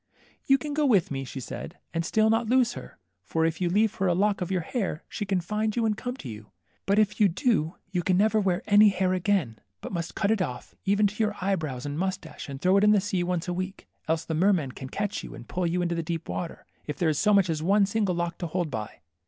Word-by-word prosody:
You 270 - +6
can 295 +1 -5
go 305 +1 +1
with 215 - +3
me/' 135 -1 -3
she 135 - -6
said, 160 +6 -7 0.2
and 165 0 0
still 220 +5 +3
not 225 0 +1
lose 250 -1 +3
her - - -10
\ - - -51
for 160 0 +1
if 165 +2 -1
you 175 - +2
leave 210 +4 +2
her 195 - -1
a 175 - +2
lock 200 +1 +1
of 180 - -2
your 185 -2 0
hair, 185 - -3
she 205 - -5
can 190 -2 +1
find 210 +4 -1
you 235 -2 +1
and 215 -1 +1
come 245 +4 -5
to 135 - -8
you; 110 -2 -9 0.4
but 200 +1 +3
if 210 -1 +2
you 205 - +7
do, 180 - 0 0.2
you 180 -2 0
can 180 +1 +2
never 215 +2 +3
wear 185 -3 0
any 210 0 +7
hair 190 -1 +1
again, 180 - 0 0.2
but - - -7
must 170 -2 -4
cut 200 0 +1
it 220 -3 +1
off 125 -9 -4
even 200 +1 +3
to 210 +2 0
your 210 -1 0
eye 195 +2 +1
brows 145 -7 -5
and 145 +2 -3
moustache, 175 -6 -4
and 135 -1 -6
throw 185 +5 +4
it 200 - +3
into 210 0 +6
the - - +4
sea 190 -2 -1
once 175 -1 -1
a 180 - -1
week. 185 +2 -5 0.2
Else 160 0 0
the 160 - -3
mermen 165 -5 +2
can 130 +1 -8
catch 205 +6 -3
you, - - -8
and - - -11
pull 180 -1 -1
you 175 +1 0
into 170 -1 0
the 170 - -1
deep 165 0 -4
water, 170 -2 -5 0.2
if 150 - -4
there 170 - +2
is 150 - 0
so 210 +1 +3
much 200 -3 +5
as 160 -2 -1
one 200 +4 +4
single 200 -2 0
lock 170 0 -2
to 175 - -2
hold 170 -1 -2
by." 110 -3 -6
185 Hz, 275 wpm, -27 LUFS, 165-210 Hz, 0.4 s, you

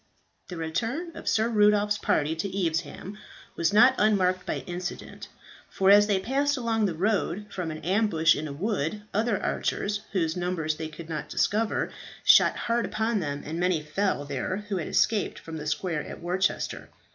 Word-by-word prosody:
The 180 - -7
return 235 - -3
of - - -3
Sir 220 +1 +2
Rudolph's 210 -2 +3
party 155 +2 +1
to 195 +5 -2 0.2
Evesham 170 +5 -4 0.4
was 165 -1 +1
not 245 +5 +7
unmarked 185 -4 +2
by - - -2
incident, 175 +1 -6 0.4
for 195 0 +3
as 205 +1 +7
they 200 -3 +2
passed 280 +7 0
along 225 -3 +1
the 175 - -3
road, 205 +1 0
from 180 -3 -3
an 155 -1 -7
ambush 180 -4 +3
in 155 +2 -4
a - - -6
wood 195 +3 -2
other 215 0 +1
archers, 205 0 -1
whose 165 -5 0
numbers 175 -4 -2
they 160 - -4
could 155 +1 -10
not 150 -2 -5
discover, 215 +7 0 0.3
shot - - +6
hard 235 0 -1
upon 220 0 0
them, 145 -4 -4
and 160 +3 -4
many 175 -3 +1
fell 155 -1 -1
there 145 +9 -3
who 195 - -1
had 165 - -3
escaped 215 -3 +1
from 160 -1 -8
the 150 0 -6
square 160 0 -1
at - - -9
Worcester. 180 +2 -1
185 Hz, 175 wpm, -27 LUFS, 160-210 Hz, 0.4 s, not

